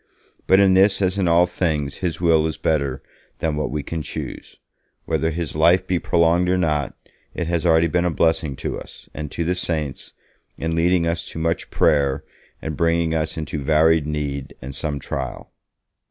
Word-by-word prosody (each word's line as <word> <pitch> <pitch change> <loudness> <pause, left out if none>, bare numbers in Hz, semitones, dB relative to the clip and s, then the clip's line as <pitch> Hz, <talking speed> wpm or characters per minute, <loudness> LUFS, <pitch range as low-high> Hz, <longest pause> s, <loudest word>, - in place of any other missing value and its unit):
But 95 - +6
in 95 -1 +5
this 95 +2 +5
as 95 0 +1
in 95 - +1
all 85 +1 +5
things 75 -6 -2
His 85 -3 -3
will 80 -2 +3
is 80 - -4
better 70 -4 -1 0.3
than 80 -2 -1
what 75 0 -2
we 75 +1 -3
can 80 +2 -4
choose. - - -7 0.5
Whether 80 - 0
his 85 -1 -4
life 85 +4 +4
be 90 -2 0
prolonged 85 +2 +2
or 90 - +2
not, 75 -6 0 0.4
it 85 - -2
has 85 +1 0
already 80 0 +5
been 85 +2 +1
a - - +2
blessing 80 -3 +1
to - - -4
us, - - -13
and 75 -1 -5
to 85 - -3
the 85 +2 0
saints, 80 -6 -3 0.4
in 80 0 -2
leading 85 +1 +2
us 85 0 -2
to - - -9
much 80 +1 -1
prayer, 70 -3 +2 0.4
and 80 -1 -3
bringing 85 +1 +1
us 80 0 -2
into 80 0 -4
varied 80 +1 +3
need 70 -3 -4
and 65 +2 -8
some 75 0 -3
trial.' 65 -2 -5
80 Hz, 185 wpm, -22 LUFS, 75-85 Hz, 0.5 s, But